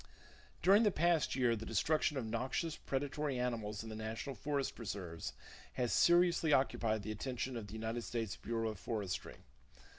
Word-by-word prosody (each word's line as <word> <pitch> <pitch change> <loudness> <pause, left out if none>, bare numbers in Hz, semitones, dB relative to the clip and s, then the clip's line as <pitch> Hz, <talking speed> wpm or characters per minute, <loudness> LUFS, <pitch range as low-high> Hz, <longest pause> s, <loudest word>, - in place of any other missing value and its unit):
During 195 +5 +7
the 215 - +5
past 170 -3 +2
year 125 -3 +3
the 110 - -6
destruction 150 +7 +1
of 125 - -2
noxious 130 +8 -1
predatory 140 0 -2
animals 110 -4 -2
in 110 - -7
the 110 - -5
national 110 +5 -4
forest 140 -2 -2
reserves 95 -7 -5 0.4
has 125 -2 0
seriously 175 -2 +5
occupied 110 -6 +2
the 110 - -3
attention 125 +3 -3
of 110 -3 -5
the - - -10
United 110 +2 -3
States 115 -3 -3
Bureau 115 -1 -2
of 105 -4 -6
Forestry. 100 -3 -3
120 Hz, 160 wpm, -36 LUFS, 110-145 Hz, 0.4 s, During